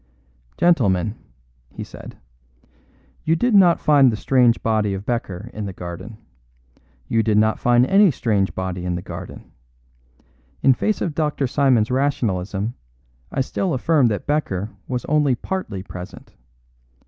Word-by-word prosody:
"Gentlemen," 105 - +2 0.6
he - - -8
said, - - -11 1.1
"you 160 - +2
did 240 +8 +1
not 180 -4 +6
find 140 -4 +5
the - - -2
strange 120 +1 +2
body 105 -3 +1
of 95 +1 -7
Becker 115 -3 -4
in 105 -1 -5
the 95 - -6
garden. 90 +5 -8 0.9
You 115 - +2
did 110 -2 +1
not 110 +1 +2
find 120 0 +4
any 195 +5 +5
strange 105 -8 0
body 95 -1 -4
in 90 -1 -2
the 90 - -5
garden. - - -9 1.1
In 135 - +6
face 215 +10 -1
of 170 - -1
Dr. 150 -2 -1
Simon's 125 -4 +2
rationalism, 110 -6 -1 0.6
I - - -1
still 170 +5 -1
affirm 140 0 +3
that 105 -3 -2
Becker 110 -9 -1 0.2
was 125 -2 -3
only 150 -3 +2
partly 120 - -5
present. 90 -1 -10
120 Hz, 140 wpm, -21 LUFS, 100-145 Hz, 1.1 s, not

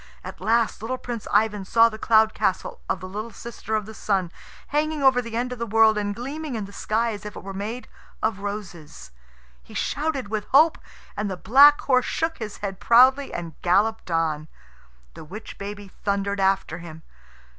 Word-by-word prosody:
At - - -9
last 230 -1 +1
little 250 +4 -3
Prince 240 -3 -6
Ivan 210 -1 +2
saw 230 +4 +5
the 220 -1 -7
cloud 220 -1 +4
castle 190 - -2
of 185 - -1
the 185 - -6
little 210 +4 -5
sister 225 0 -6
of 215 -2 -1
the 220 - -10
Sun, 195 -5 -1 0.4
hanging 300 0 0
over 260 -2 +5
the 230 -1 -5
end 250 +1 -1
of 250 - -9
the 235 - -1
world 220 0 +5
and 205 -1 -2
gleaming 280 +3 -5
in 215 -3 -3
the 200 - -13
sky 225 +3 0
as 205 - -8
if 210 -1 -8
it - - -9
were 195 0 -7
made 215 +6 -5 0.3
of 215 -3 -1
roses. 185 - -7 0.5
He 60 - -15
shouted 285 -7 -2
with 215 -1 -2
hope, 310 +4 +4 0.4
and 210 -1 -2
the 185 - -4
black 280 +10 +6
horse 255 -2 +2
shook 325 -1 -2
his 215 -2 -6
head 195 -1 -5
proudly 260 +5 +5
and 170 -2 -5
galloped 200 +4 +1
on. 160 -2 0 0.7
The - - -10
witch 205 +8 -10
baby 200 -1 -7
thundered 200 -1 -1
after 195 -1 +1
him. 160 -2 -10
215 Hz, 190 wpm, -24 LUFS, 195-240 Hz, 0.7 s, black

